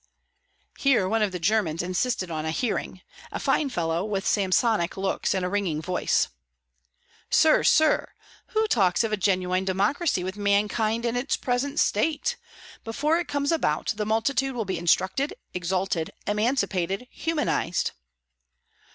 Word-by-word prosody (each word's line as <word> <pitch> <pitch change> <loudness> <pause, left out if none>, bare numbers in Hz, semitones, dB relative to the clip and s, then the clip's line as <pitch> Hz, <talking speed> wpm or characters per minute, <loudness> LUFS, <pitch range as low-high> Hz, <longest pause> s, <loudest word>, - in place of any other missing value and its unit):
Here 255 -9 +3
one 225 +3 +1
of 210 -2 +1
the 180 - -3
Germans 175 -3 +1
insisted 185 +1 -1
on 155 -1 -3
a 160 - -2
hearing; 185 0 -2 0.3
a - - -4
fine 290 - +1
fellow, 170 -5 -1
with 200 -2 -2
Samsonic 200 -1 +1
locks 195 0 -1
and 185 -1 -1
a - - 0
ringing 185 -5 -1
voice. 180 +3 0 1.0
"Sir! 315 -1 +5
sir! 315 -1 +3 0.4
who 440 -1 +1
talks 195 - +2
of 220 -1 -1
a - - +4
genuine 185 -2 +1
democracy 195 - 0
with 185 +2 -5
mankind 210 +3 +1
in 235 0 0
its 245 +3 0
present 270 +4 -1
state? 305 - +1 0.5
Before 295 +9 0
it 350 - -3
comes 285 +1 0
about, 325 -6 0
the 210 0 -3
multitude 255 +4 0
will 225 -3 -2
be 185 -3 -3
instructed, 185 - +1 0.2
exalted, 180 -2 -1 0.2
emancipated, 210 -2 0
humanized!" 300 - -1
205 Hz, 145 wpm, -25 LUFS, 185-250 Hz, 1.0 s, Sir